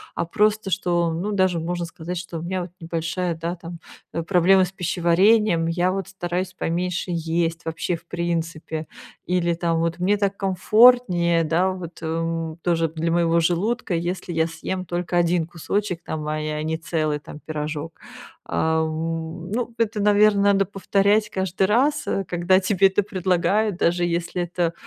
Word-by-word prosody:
а 170 - -1
просто, 210 +3 +1
что, 175 -3 +1
ну, 190 +6 -2
даже 185 -4 +2
можно 175 +1 -3
сказать, 175 +1 -6
что 175 -1 -6
у - - -7
меня 185 +1 -2
вот 175 - -9
небольшая, 165 +1 -2
да, 170 +2 -4
там, 170 0 -9 0.3
э, 165 - -1
проблема 185 +1 +4
с 180 - -8
пищеварением, 180 +1 +3
я 175 +2 +1
вот 195 -2 -3
стараюсь 180 -1 -3
поменьше 180 +1 -2
есть 165 0 -1
вообще, 165 +2 -2
в 165 - -13
принципе. 165 -2 -3 0.4
Или 175 -1 +1
там 165 -1 0
вот: 165 0 -1
мне 200 +3 +2
так 200 -1 -1
комфортнее, 190 -3 +4
да, 170 +4 +2
вот, 175 -3 -8
эм, 165 +1 -1 0.3
тоже 165 -2 +1
для 165 +1 -2
моего 170 0 +3
желудка, 185 +6 0
если 175 +1 -3
я 160 0 +2
съем 185 +3 -4
только 175 +1 -3
1 170 -1 +2
кусочек 180 +1 -2
там, 155 -1 -4
ай, 155 0 -2
а - - -3
не 160 0 -1
целый 155 -3 -1
там 150 +1 -11
пирожок. 155 +1 -5 0.5
А, 160 0 +1
м, 165 +2 -3
ну, 240 +1 -2
это, 225 -2 0
наверно, 205 0 +4
надо 200 -1 +4
повторять 200 +2 +1
каждый 190 0 0
раз, 280 +7 +2
э, 195 - 0
когда 180 +2 +2
тебе 195 0 +3
это 190 +2 +1
предлагают, 190 +1 0
даже 175 0 +1
если 170 +1 -2
это, 175 -1 -1
175 Hz, 165 wpm, -23 LUFS, 165-190 Hz, 0.5 s, проблема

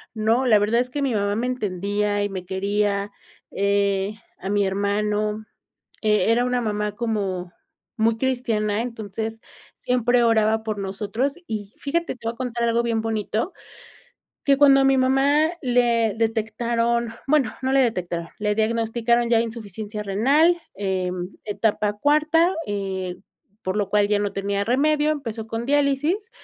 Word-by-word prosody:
no, 225 +4 +2
la 215 -3 +6
verdad 215 +3 +2
es 250 +1 0
que 285 +3 -3
mi 265 -3 0
mamá 205 0 0
me 240 +3 -1
entendía 205 -2 -1
y 205 - -1
me 185 -2 -6
quería, 200 +1 -1 0.4
eh, 200 0 +1 0.3
a 190 - -5
mi 205 -1 +2
hermano, 210 +2 -1 0.6
eh, 210 -1 +3
era 240 +2 +2
una 250 0 0
mamá 210 -2 -1
como 195 -6 -2 0.4
muy 220 +1 +2
cristiana, 225 -4 0
entonces, 225 -1 -5 0.3
siempre 245 0 +1
oraba 220 -1 +3
por 215 -2 -3
nosotros, 210 +8 -2
y 210 -2 -5
fíjate, 335 +3 -1
te 230 -2 -5
voy 230 - -3
a - - -22
contar 240 -2 -2
algo 230 +1 +2
bien 230 -1 0
bonito, 220 - -2 0.9
que 275 -1 +4
cuando 275 -1 +6
a - - +3
mi 270 0 +4
mamá 275 +4 +3 0.2
le 240 -3 +2
detectaron, 230 +1 0 0.2
bueno, 280 -5 +3
no 265 +1 +1
le 275 - +5
detectaron, 175 -8 -2
le 210 0 0
diagnosticaron 230 +2 +1
ya 230 -1 +5
insuficiencia 215 -2 -5
renal, 275 - +3 0.2
eh, 190 -2 -1 0.3
etapa 210 0 0
cuarta, 305 - +3
eh, 190 -3 -3 0.5
por 185 +1 -2
lo 205 -2 -1
cual 205 0 +3
ya 205 0 +2
no 205 -1 -1
tenía 200 0 -1
remedio, 295 +6 +2
empezó 230 -7 -3
con 225 +1 -4
diálisis. 290 - +1
220 Hz, 150 wpm, -23 LUFS, 205-245 Hz, 0.9 s, la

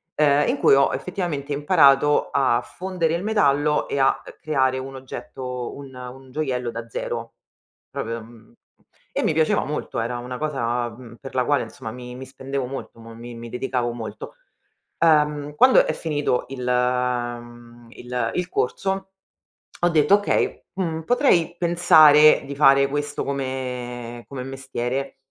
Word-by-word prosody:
ehm, 145 -1 +3
in - - 0
cui - - +6
ho 140 -1 +3
effettivamente 150 -2 -3
imparato 145 -2 +4
a 125 -3 +2
fondere 175 0 -2
il 170 - -3
metallo 150 -8 +2
e 140 - -3
a, 135 - +3
uhm, - - -11
creare 130 -4 +1
un 135 +1 -7
oggetto 125 -1 -6
un 140 -2 -10
un 125 +1 -10
gioiello 125 -5 -2
da 115 0 -7
zero 115 0 -5 0.6
proprio 115 +1 -4
mhmm, 115 0 -17 0.6
e - - -1
mi - - +2
piaceva 155 0 +2
molto 150 -3 -4
era 120 +2 -2
una 125 +1 -6
cosa, 125 -5 -1
mhmm, 115 0 -12
per 135 -1 -9
la 125 - +2
quale 145 -1 +2
insomma 110 0 -8
mi 125 0 -9
mi 130 +1 -8
spendevo 135 0 -4
molto, 135 -3 -8
mo 115 0 -11
mi 120 +1 -9
mi 115 0 -8
dedicavo 125 -1 -2
molto. 115 - -8 0.6
Uhm, 150 -2 +2
quando 255 +10 +6
è - - -1
finito 145 -5 -1
il 130 -2 -6
mhmm, 120 -1 -2
il 125 -2 -3
il 180 0 -2
corso 190 +8 -1 0.8
ho 175 - +5
detto: 155 +2 +4
"Okay, 205 - -1
mhmm, 165 -4 -2
potrei 175 - +2
pensare 155 -3 +6
di 140 - -6
fare 140 -1 +6
questo 145 +1 -3
come 125 -3 -4
come 135 -2 -6
mestiere." 135 0 -4
135 Hz, 155 wpm, -23 LUFS, 125-150 Hz, 0.8 s, cui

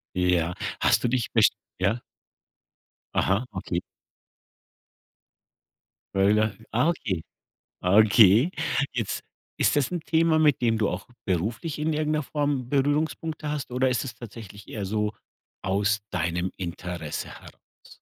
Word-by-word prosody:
Ja, 90 -1 +2 0.3
hast - - +3
du - - +3
dich 125 -1 0
besch - - +6 0.3
ja? 100 +6 +1 1.1
Aha, 100 +6 +2
okay. - - -2 2.4
Gorilla, 105 +2 +3 0.2
ah, 125 +9 +3
okay. 100 - -2 0.6
Okay. 110 - +6 0.4
Jetzt 115 -4 -2 0.4
ist - - +3
das 145 +1 +2
'n 175 - -1
Thema, 160 0 +3
mit 150 -4 +4
dem 115 -2 +2
du 105 - +2
auch 90 +3 -4 0.2
beruflich 110 - -2
in 155 +1 0
irgend 155 0 0
'ner 155 0 +1
Form 145 -3 -1
Berührungspunkte 150 +2 0
hast 145 -4 -3
oder 130 +1 +2
ist 125 +1 0
es 130 - -6
tatsächlich 105 -4 -11
eher 105 -3 -4
so 105 +1 -1 0.5
aus 100 +2 +1
deinem 90 +1 -1
Interesse 85 -3 -5
heraus? - - -15
110 Hz, 125 wpm, -26 LUFS, 95-145 Hz, 2.4 s, besch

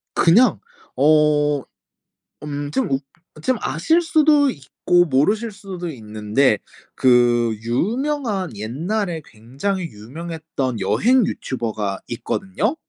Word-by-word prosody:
그냥 210 +10 +5 0.4
어 150 -1 +3 0.9
음 145 -1 -4
좀 135 - 0
웃 135 - 0 0.4
좀 255 +8 +1
아실 320 - +2
수도 305 -3 +4
있고 175 - +1
모르실 205 - +1
수도 190 -4 -7
있는데 110 -1 0 0.3
그 120 -2 +3
유명한 210 - -1
옛날에 165 - -3
굉장히 140 - -4
유명했던 150 0 -5
여행 250 +1 +3
유튜버가 110 - -3
있거든요. 190 - -2
155 Hz, 210 characters per minute, -21 LUFS, 120-205 Hz, 0.9 s, 그냥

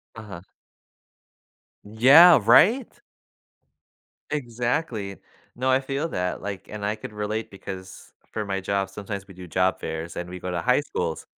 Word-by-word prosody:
Uh-huh. 105 -6 -9 1.4
Yeah, 135 +11 +7
right? 185 - +5 1.4
Exactly. 120 -5 -2 0.4
No, 130 +2 -1
I 130 0 +4
feel 135 +4 -3
that, 90 - -3
like 100 -1 -6
and 105 -1 -5
I 105 - -1
could 110 - -9
relate 105 +1 -4
because 95 -1 -10 0.2
for 105 - -3
my 95 -1 -2
job, 95 0 -1
sometimes 100 0 -7
we 95 - -13
do 90 0 -11
job 95 +2 +1
fairs 80 +1 -5
and 85 0 -5
we 90 0 -7
go 90 - -5
to 85 -1 -2
high 125 +6 +3
schools, 85 - -4
105 Hz, 145 wpm, -24 LUFS, 95-125 Hz, 1.4 s, Yeah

